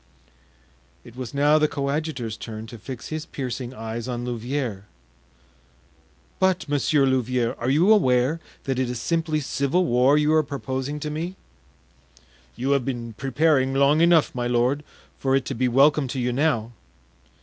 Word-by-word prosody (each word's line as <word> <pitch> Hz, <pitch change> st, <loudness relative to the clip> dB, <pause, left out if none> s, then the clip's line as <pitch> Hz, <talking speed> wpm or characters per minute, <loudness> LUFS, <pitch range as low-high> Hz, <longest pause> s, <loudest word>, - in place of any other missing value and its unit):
It 120 Hz, -1 st, -14 dB
was 125 Hz, -3 st, -6 dB
now 145 Hz, +2 st, +3 dB
the 155 Hz, -, +3 dB
coadjutor's 140 Hz, -5 st, -3 dB
turn 110 Hz, -1 st, -7 dB
to 115 Hz, 0 st, -11 dB
fix 120 Hz, +1 st, -8 dB
his 155 Hz, +1 st, -5 dB
piercing 125 Hz, -2 st, -5 dB
eyes 115 Hz, -1 st, -6 dB
on 120 Hz, -1 st, -3 dB
Louvieres. 120 Hz, -4 st, -3 dB, 1.5 s
"But, 185 Hz, -4 st, +1 dB
Monsieur 145 Hz, 0 st, +2 dB
Louvieres, 125 Hz, -2 st, 0 dB
are 120 Hz, -, -1 dB
you 170 Hz, +10 st, +5 dB
aware 130 Hz, -4 st, +2 dB, 0.2 s
that 135 Hz, -2 st, -2 dB
it 130 Hz, -2 st, 0 dB
is 125 Hz, -1 st, -4 dB
simply 160 Hz, +2 st, 0 dB
civil 140 Hz, +6 st, 0 dB
war 130 Hz, +2 st, +4 dB
you 150 Hz, +1 st, +3 dB
are 155 Hz, -, +5 dB
proposing 135 Hz, 0 st, -4 dB
to 150 Hz, -, -3 dB
me?" 170 Hz, +5 st, -4 dB, 1.2 s
"You 130 Hz, +3 st, -1 dB
have 140 Hz, -2 st, +2 dB
been 120 Hz, -3 st, -4 dB
preparing 135 Hz, +2 st, +1 dB
long 140 Hz, +3 st, +4 dB
enough, 170 Hz, -2 st, +4 dB
my 120 Hz, -1 st, -2 dB
lord, 125 Hz, +4 st, +1 dB, 0.4 s
for 135 Hz, 0 st, +1 dB
it 135 Hz, -2 st, 0 dB
to -, -, -3 dB
be 125 Hz, +2 st, 0 dB
welcome 140 Hz, +3 st, +4 dB
to 130 Hz, +1 st, -4 dB
you 125 Hz, 0 st, 0 dB
now." 125 Hz, -5 st, 0 dB
135 Hz, 160 wpm, -24 LUFS, 120-150 Hz, 1.5 s, you